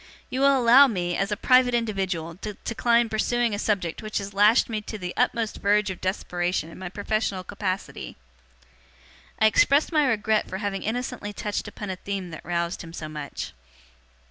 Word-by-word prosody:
You 260 - -2
will 275 0 +5
allow 255 +3 +7
me, 175 -7 -2
as 195 +1 -1
a 210 - -1
private 255 0 +4
individual, 190 -8 -2
to 210 +1 -6
decline 235 0 +2
pursuing 235 +1 0
a 205 - -2
subject 190 -7 -1
which 215 -1 -4
has 200 0 -4
lashed 210 +4 +5
me 220 -2 -3
to 215 +1 -7
the 180 -2 -5
utmost 235 -3 0
verge 205 0 +2
of 185 - -8
desperation 175 -2 -2
in - - -12
my 185 -1 -5
professional 205 -1 -2
capacity.' 190 0 -4 1.2
I 220 - +4
expressed 280 - +4
my 305 -3 +3
regret 220 -2 +1
for 190 - -4
having 195 -1 -3
innocently 225 -2 -3
touched 210 0 -3
upon 205 -1 -6
a 185 - -5
theme 195 -2 -5
that 155 - -9
roused 170 +1 -2
him 165 0 -10
so 155 - -6
much. 150 -2 -6
205 Hz, 180 wpm, -25 LUFS, 185-230 Hz, 1.2 s, allow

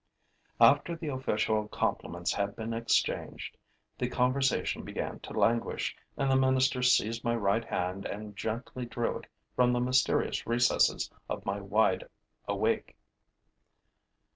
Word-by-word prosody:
After 145 +8 +5
the 160 -2 -5
official 110 -5 0
compliments 85 -4 -2
had 100 0 -2
been 115 0 -4
exchanged, 115 0 -1 0.4
the - - 0
conversation 130 +2 +1
began - - -4
to - - -9
languish; 115 0 +1 0.2
and 135 -1 +1
the - - +4
minister 130 0 +3
seized 115 -2 +3
my 120 -1 +1
right 110 0 +1
hand 90 0 -3
and 105 0 -7
gently 120 +4 -4
drew 120 0 -2
it - - -15 0.3
from 125 -1 +4
the 120 - +1
mysterious 130 +1 +1
recesses 120 +1 +2 0.2
of - - -4
my 100 +1 -1
wide 100 -1 +2 0.4
awake. - - 0
115 Hz, 130 wpm, -30 LUFS, 105-130 Hz, 0.4 s, After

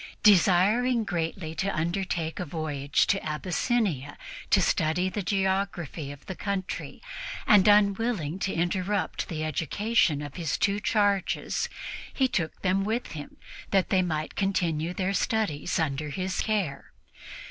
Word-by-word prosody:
Desiring 210 +5 +5
greatly 165 -3 -3
to 190 +5 -1
undertake 170 -1 -2
a - - -1
voyage 145 -3 0
to 195 - +1
Abyssinia 160 - -1 0.3
to - - +5
study 170 +4 +1
the 205 +3 -3
geography 190 -6 -1
of 145 0 -12
the 190 - -5
country 195 - -4 0.4
and 210 -5 +6
unwilling 200 -4 +3
to 190 - -1
interrupt 185 +3 -1
the 155 -2 -3
education 160 - +1
of 145 +2 -8
his 165 -3 -1
two 205 - +2
young 205 +1 -3
charges, 205 -3 +1 0.4
he 265 - +2
took 165 -10 -3
them 190 +1 +2
with 225 +4 -2
him, 150 -3 -8 0.3
that 195 -2 +2
they 185 - +4
might 155 -3 -2
continue 175 -4 0
their 185 +2 -1
studies 200 -9 0
under 150 -2 -1
his 185 +4 -2
care. 200 -10 -2
185 Hz, 135 wpm, -27 LUFS, 160-200 Hz, 0.4 s, and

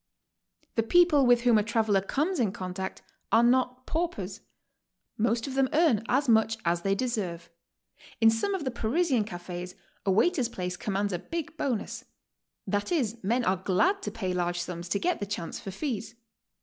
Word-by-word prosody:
The 225 - +2
people 300 +1 +4
with 245 -1 +5
whom 235 -3 +5
a - - +1
traveler 220 -3 +2
co 270 +10 0
mes 370 -1 -2
in 220 -6 +2
contact 185 0 -5 0.3
are 230 - +5
not 255 +1 +2
paupers. 220 - -3 0.7
Most 230 +1 +1
of 275 - -5
them 270 -1 +2
earn 300 -9 +3
as 270 +3 +2
much 225 -1 +3
as 170 0 +1
they 195 +2 +1
deserve. 195 -9 -3 0.7
In 225 -1 +6
some 390 - 0
of 340 -6 -4
the 260 - -1
Parisian 245 +1 +1
cafes 175 -1 -7 0.3
a - - -1
waiter's 250 - +3
place 180 -5 -4
commands 200 +1 -2
a 175 - -1
big 325 - -5
bonus; 255 -9 -3 0.6
that 205 +5 -1
is, 235 -9 -1
men 235 +5 +1
are 185 +1 +2
glad 210 - +1
to - - -3
pay 185 -5 -3
large 175 -1 -1
sums 175 0 -5
to 200 - +1
get 360 - 0
the 205 - -4
chance 185 -5 -4
for - - -7
fees. 225 0 -4
225 Hz, 180 wpm, -28 LUFS, 190-260 Hz, 0.7 s, In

